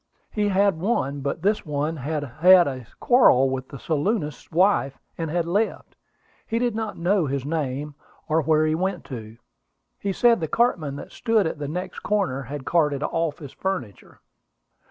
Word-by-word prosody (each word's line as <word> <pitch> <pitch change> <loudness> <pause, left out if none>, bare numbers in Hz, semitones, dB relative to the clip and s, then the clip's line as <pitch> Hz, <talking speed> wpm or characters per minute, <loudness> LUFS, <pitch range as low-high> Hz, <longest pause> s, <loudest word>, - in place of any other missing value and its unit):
He 210 -1 0
had 195 -3 +2
one; 145 - -1
but 140 +4 -3
this 210 +2 +1
one 150 +1 -2
had 150 +2 -3
had 175 +6 +5
a 130 -4 -5
quarrel 135 - +5
with 130 0 -4
the 140 - -8
saloonist's 155 - -2
wife, 170 -6 +2 0.2
and 165 -2 -4
had 170 +1 0
left. 205 +6 -1 0.5
He 225 - -1
did 240 -1 0
not 220 0 -4
know 175 -1 +1
his 135 -1 -2
name, 145 -1 -3 0.3
or 160 +1 +2
where 155 +1 +3
he 155 - +1
went 180 +1 -2
to. 110 -2 -8 0.6
He 200 - -2
said 235 +3 +4
the 160 - -2
cartman 165 - +1
that - - -9
stood 225 -4 +1
at 160 - -3
the 145 - -3
next 180 +5 -5
corner 195 -10 -1
had 135 +1 -7
carted 150 -4 +1
off 165 -1 -1
his 140 -4 -10
furniture." 160 - -5
160 Hz, 175 wpm, -24 LUFS, 140-195 Hz, 0.6 s, had